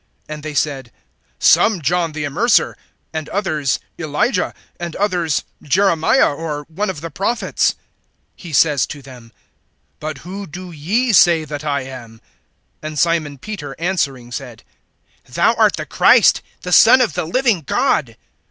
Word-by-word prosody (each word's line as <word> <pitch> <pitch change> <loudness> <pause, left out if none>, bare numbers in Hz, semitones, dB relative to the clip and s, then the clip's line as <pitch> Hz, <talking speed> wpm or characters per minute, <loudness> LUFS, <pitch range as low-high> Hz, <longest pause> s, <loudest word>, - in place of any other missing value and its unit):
(14)And 150 0 -7
they 155 0 -6
said: 135 -5 -1 0.5
Some, 215 -4 +4
John 165 +2 0
the 150 -1 -4
Immerser; 210 - +2 0.4
and 160 -1 -4
others, 155 -9 -1 0.2
Elijah; 175 - 0 0.3
and 170 -2 -5
others, 180 -7 0 0.2
Jeremiah, 170 - +3
or 150 -1 -5
one 190 +8 -4
of 155 -6 -5
the 165 0 -6
prophets. 210 +8 0 0.6
(15)He 165 -5 -6
says 145 -2 +3
to 145 -2 -9
them: 125 -3 -13 0.7
But 155 -2 -5
who 200 +1 -6
do 180 +3 -9
ye 210 - 0
say 170 -4 +5
that 150 0 -6
I 140 -2 -1
am? 120 -4 -10 0.6
(16)And 155 0 -6
Simon 155 -2 +1
Peter 150 -4 -7
answering 140 -9 -2
said: 125 -3 -8 0.7
Thou - - +2
art - - +3
the - - -5
Christ, - - +4 0.2
the 180 - -6
Son 240 +7 +8
of 250 -4 +1
the 180 -2 -2
living 225 +1 +1
God. 140 - 0
155 Hz, 145 wpm, -18 LUFS, 145-185 Hz, 0.7 s, Son